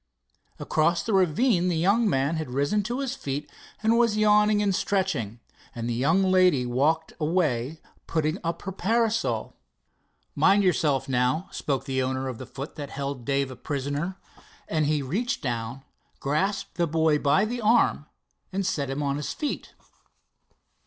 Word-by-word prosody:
Across 165 Hz, +3 st, +1 dB
the 225 Hz, -, -2 dB
ravine 185 Hz, -, +3 dB
the 175 Hz, -2 st, +1 dB
young 200 Hz, +7 st, +3 dB
man 140 Hz, +1 st, +1 dB
had 155 Hz, -4 st, -4 dB
risen 145 Hz, +11 st, +1 dB
to 250 Hz, +3 st, -2 dB
his 270 Hz, -1 st, -2 dB
feet 140 Hz, -, -4 dB, 0.4 s
and 225 Hz, +2 st, +4 dB
was 230 Hz, -3 st, +3 dB
yawning 210 Hz, 0 st, +4 dB
and 200 Hz, -1 st, +2 dB
stretching, 185 Hz, -, -1 dB, 0.4 s
and 115 Hz, -1 st, -4 dB
the 120 Hz, -, -1 dB
young 160 Hz, +11 st, +2 dB
lady 180 Hz, -9 st, +4 dB
walked 150 Hz, +7 st, +1 dB
away 155 Hz, -4 st, 0 dB, 0.3 s
putting 160 Hz, +2 st, 0 dB
up 170 Hz, 0 st, -3 dB
her 195 Hz, -, -4 dB
parasol. 225 Hz, +4 st, 0 dB, 0.8 s
"Mind 200 Hz, +1 st, +4 dB
yourself, 155 Hz, -7 st, +1 dB
now," 130 Hz, +7 st, +1 dB
spoke 135 Hz, -2 st, -2 dB
the 130 Hz, -1 st, -1 dB
owner 130 Hz, +1 st, -1 dB
of 125 Hz, -3 st, -5 dB
the 130 Hz, -, -8 dB
foot 135 Hz, +3 st, -8 dB
that 145 Hz, -2 st, -5 dB
held 140 Hz, -3 st, -5 dB
Dave 140 Hz, -1 st, 0 dB
a -, -, -8 dB
prisoner, 145 Hz, +7 st, -3 dB, 0.5 s
and 155 Hz, -2 st, 0 dB
he 150 Hz, -2 st, +1 dB
reached 205 Hz, -, -2 dB
down, 120 Hz, +1 st, -3 dB, 0.4 s
grasped 190 Hz, +9 st, -1 dB
the 170 Hz, -1 st, +2 dB
boy 160 Hz, -1 st, +2 dB
by 150 Hz, +9 st, +3 dB
the 240 Hz, +2 st, -3 dB
arm 215 Hz, -, +3 dB, 0.4 s
and 195 Hz, 0 st, -2 dB
set 145 Hz, -7 st, -1 dB
him 135 Hz, +2 st, -2 dB
on 140 Hz, 0 st, 0 dB
his 150 Hz, -, -3 dB
feet. 300 Hz, -, -4 dB
155 Hz, 160 wpm, -26 LUFS, 135-195 Hz, 0.8 s, and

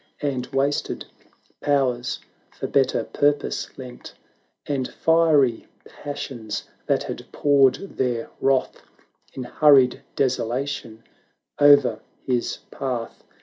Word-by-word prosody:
And 130 Hz, -3 st, -1 dB
wasted 140 Hz, +2 st, -1 dB, 0.5 s
powers 130 Hz, -4 st, 0 dB, 0.3 s
for -, -, -7 dB
better 135 Hz, -1 st, +2 dB
purpose 145 Hz, 0 st, 0 dB
lent; 125 Hz, -2 st, -10 dB, 0.5 s
And 135 Hz, -3 st, -2 dB
fiery 155 Hz, -7 st, +3 dB, 0.2 s
passions 125 Hz, -6 st, -6 dB, 0.2 s
that -, -, +2 dB
had -, -, -7 dB
poured 140 Hz, -3 st, +4 dB, 0.2 s
their 120 Hz, -3 st, -1 dB
wrath 135 Hz, -1 st, +1 dB, 0.5 s
In 130 Hz, -, -4 dB
hurried 130 Hz, 0 st, +4 dB
desolation 125 Hz, -2 st, -2 dB, 0.6 s
o'er 145 Hz, -6 st, +6 dB, 0.3 s
his 125 Hz, -2 st, -1 dB
path. 125 Hz, -4 st, -4 dB
135 Hz, 95 wpm, -23 LUFS, 125-145 Hz, 0.6 s, o'er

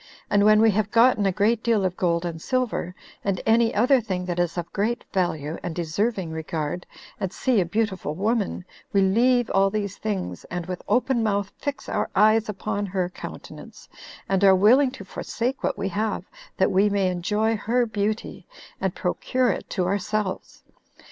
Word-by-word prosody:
And 205 Hz, 0 st, +4 dB
when 215 Hz, 0 st, +6 dB
we 225 Hz, -1 st, +6 dB
have 210 Hz, 0 st, 0 dB
gotten 230 Hz, -3 st, +4 dB
a -, -, +2 dB
great 215 Hz, +4 st, +1 dB
deal 225 Hz, -5 st, +2 dB
of 180 Hz, -1 st, -1 dB
gold 170 Hz, -1 st, 0 dB
and 165 Hz, -2 st, -5 dB
silver, 240 Hz, -8 st, -1 dB, 0.3 s
and 195 Hz, -2 st, -1 dB
any 225 Hz, +1 st, +4 dB
other 250 Hz, +4 st, +3 dB
thing 185 Hz, -5 st, -3 dB
that 175 Hz, -1 st, -3 dB
is 175 Hz, 0 st, 0 dB
of 170 Hz, 0 st, -5 dB
great 220 Hz, +4 st, -1 dB
value, 160 Hz, -4 st, -1 dB
and 175 Hz, -2 st, -5 dB
deserving 180 Hz, +2 st, -1 dB
regard, 160 Hz, +1 st, -4 dB, 0.3 s
and 190 Hz, -3 st, -2 dB
see 240 Hz, 0 st, +1 dB
a -, -, 0 dB
beautiful 190 Hz, -5 st, -2 dB
woman, 205 Hz, -1 st, -1 dB, 0.3 s
we 200 Hz, -, +3 dB
leave 240 Hz, +5 st, +3 dB
all 195 Hz, 0 st, +3 dB
these 200 Hz, -1 st, -3 dB
things, 205 Hz, -4 st, -4 dB
and 175 Hz, -1 st, -5 dB
with 180 Hz, 0 st, -5 dB
open 250 Hz, -1 st, +2 dB
mouth 200 Hz, -2 st, 0 dB
fix 285 Hz, -1 st, -5 dB
our -, -, -1 dB
eyes 215 Hz, +2 st, +4 dB
upon 205 Hz, 0 st, -3 dB
her 185 Hz, -2 st, -1 dB
countenance, -, -, -10 dB, 0.4 s
and 195 Hz, 0 st, +1 dB
are 190 Hz, -1 st, +7 dB
willing 245 Hz, +8 st, +5 dB
to 200 Hz, -6 st, -10 dB
forsake 245 Hz, +6 st, -3 dB
what -, -, 0 dB
we 195 Hz, -, -2 dB
have, 215 Hz, +2 st, -2 dB, 0.3 s
that -, -, +3 dB
we 200 Hz, +2 st, +4 dB
may 200 Hz, -2 st, +1 dB
enjoy 210 Hz, +5 st, 0 dB
her 235 Hz, +4 st, +1 dB
beauty, 215 Hz, 0 st, -3 dB, 0.3 s
and -, -, -1 dB
procure 255 Hz, -2 st, 0 dB
it -, -, -5 dB
to 185 Hz, -, -1 dB
ourselves. 200 Hz, +1 st, -2 dB
200 Hz, 180 wpm, -24 LUFS, 185-225 Hz, 0.4 s, are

